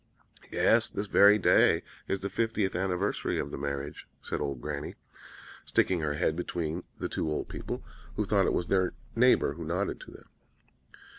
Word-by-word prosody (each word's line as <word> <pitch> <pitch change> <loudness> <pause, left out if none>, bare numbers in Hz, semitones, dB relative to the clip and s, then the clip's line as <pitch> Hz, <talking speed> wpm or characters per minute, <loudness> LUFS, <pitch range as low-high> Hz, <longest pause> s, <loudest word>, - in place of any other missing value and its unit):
"'Yes, - - +3
this 100 - -3
very 105 +1 +6
day 100 - +4 0.2
is 95 - -1
the 100 - -2
fiftieth 110 -5 0
anniversary 90 -1 -1
of 70 - -3
the - - -5
marriage,' 70 0 -4 0.2
said - - -3
old 70 -3 -3
Granny, 75 +1 -5 0.7
sticking 90 -2 +1
her 75 -2 -1
head 80 -1 +1
between 85 -1 -3
the - - -3
two 80 - -2
old 75 - -3
people; - - -5 0.3
who 105 - 0
thought 100 -1 +3
it - - +1
was 85 - -1
their 95 -2 +2 0.2
neighbor 70 - +4
who 85 +3 -7
nodded 90 +5 -2
to - - -11
them. - - -14
90 Hz, 170 wpm, -29 LUFS, 75-95 Hz, 0.7 s, very